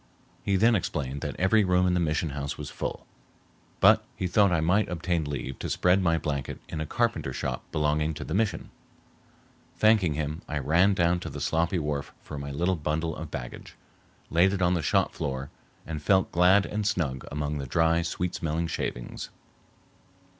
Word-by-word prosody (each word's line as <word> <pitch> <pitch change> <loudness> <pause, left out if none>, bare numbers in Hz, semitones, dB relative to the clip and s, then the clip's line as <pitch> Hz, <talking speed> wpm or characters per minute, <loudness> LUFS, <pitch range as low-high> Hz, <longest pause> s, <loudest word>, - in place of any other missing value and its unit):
He 100 - +1
then 115 +5 +4
explained 70 - -2
that - - -4
every 95 +4 +4
room 90 -1 +3
in 90 - +2
the 90 - +2
mission 80 -1 0
house 70 0 -4
was - - -6
full, - - -5 0.7
but - - +6
he - - -3
thought 100 +2 +4
I 85 - +2
might 95 +6 +2
obtain 85 -1 -1
leave 70 -2 -5
to - - -4
spread 90 +2 +3
my 85 -2 +2
blanket 70 -4 -3
in 80 - -4
a 80 - -3
carpenter - - 0
shop - - -3
belonging 75 +1 0
to 75 - -5
the 80 - -5
mission. 105 +1 -1 1.1
Thanking 105 -8 +4
him, 75 +2 -3
I 75 - -3
ran 85 +8 +3
down 85 0 +2
to - - -6
the - - -7
sloppy 85 +3 +1
wharf 75 -3 -3
for 75 - -7
my 70 0 -5
little 85 +6 0
bundle 80 +1 -2
of 80 -1 -7
baggage, - - -7 0.6
laid 90 +4 +4
it 95 - -2
on 90 +1 +3
the 85 - 0
shop - - +1
floor, 70 0 -4 0.3
and 80 -2 -5
felt 95 +4 +3
glad 90 +3 +5
and 105 -1 -2
snug 75 -10 -1
among 75 0 -2
the 70 - -5
dry, 80 +5 +2
sweet 85 +1 -2
smelling 80 +1 -1
shavings. - - -4
80 Hz, 185 wpm, -27 LUFS, 75-90 Hz, 1.1 s, but